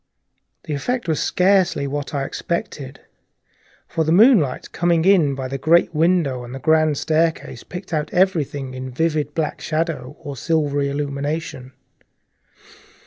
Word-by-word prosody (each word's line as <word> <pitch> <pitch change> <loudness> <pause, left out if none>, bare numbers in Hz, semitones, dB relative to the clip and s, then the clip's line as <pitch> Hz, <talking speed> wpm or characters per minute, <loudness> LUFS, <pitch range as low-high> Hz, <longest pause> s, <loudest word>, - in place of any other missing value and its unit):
The 150 - -5
effect 240 - -2
was 160 -2 0
scarcely 185 -6 +2
what 145 +1 -4
I 140 -3 -2
expected, 145 -4 -5 0.9
for 160 - -1
the 160 - 0
moonlight, 185 - +4
coming 170 -1 +1
in 170 -8 +4
by 135 -1 -4
the 135 +1 -5
great 170 +3 +3
window 155 -6 +1
on 120 +1 -9
the 135 - -6
grand 155 +1 +2
staircase, 160 -6 0
picked 180 0 -8
out 155 -1 -1
everything 150 -8 0
in 130 0 -6
vivid 150 +2 -1
black 160 -2 -2
shadow 155 -4 -3
or 145 - -7
reticulated 135 - -9
silvery 145 -3 0
illumination. 140 -1 -4
155 Hz, 140 wpm, -21 LUFS, 140-165 Hz, 0.9 s, moonlight